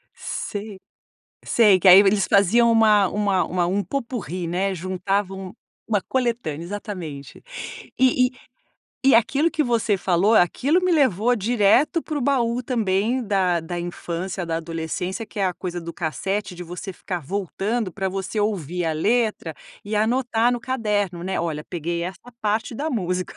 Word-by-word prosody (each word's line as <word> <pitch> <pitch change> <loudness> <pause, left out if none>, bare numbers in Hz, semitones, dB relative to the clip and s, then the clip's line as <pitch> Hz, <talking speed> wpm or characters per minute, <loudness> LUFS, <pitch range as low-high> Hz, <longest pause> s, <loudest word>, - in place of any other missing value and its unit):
Sei, 205 -1 -5 0.7
sei 205 -6 +4
que 190 - +5
aí 185 +1 +11
eles 200 -1 +3
faziam 220 +5 +4
uma 215 -3 +5
uma 200 -2 +1
uma 175 +1 0
um 195 +3 0
pot-pourri, 200 - -4
né, 185 +3 -1
juntavam 190 +1 -2 0.3
uma 210 -3 +1
coletânea, 230 - -2
exatamente, 175 -7 -7 0.6
e 255 -1 +4
e - - -20 0.7
e 270 0 +5
aquilo 270 +8 +3
que 305 - 0
você 230 -4 +1
falou, 185 +3 +2
aquilo 255 - +3
me 365 - +2
levou 245 - +3
direto 240 - +2
pro 300 -2 -3
baú 250 -2 +1
também 230 0 0
da 185 -4 +2
da 175 +2 -5
infância, 175 +1 -4
da 165 0 -1
adolescência, 165 +5 -4
que 210 - -7
é - - +2
a 180 - -2
coisa 175 -2 -5
do 170 0 -7
cassete 190 +4 -3
de 180 - -8
você 180 +3 -7
ficar 180 0 -5
voltando 200 - -2
pra 190 +3 -2
você 195 +3 -4
ouvir 180 -5 -1
a 160 - 0
letra 210 -2 0 0.3
e 210 +1 -2
anotar 235 +1 +2
no 245 - -2
caderno, 210 -8 -1
né. 190 0 -1
Olha, 155 -3 -3
peguei 170 0 -3
essa 190 +7 -8
parte 215 +3 -1
da 300 +6 -3
música, 180 - -2
200 Hz, 155 wpm, -23 LUFS, 180-230 Hz, 0.7 s, aí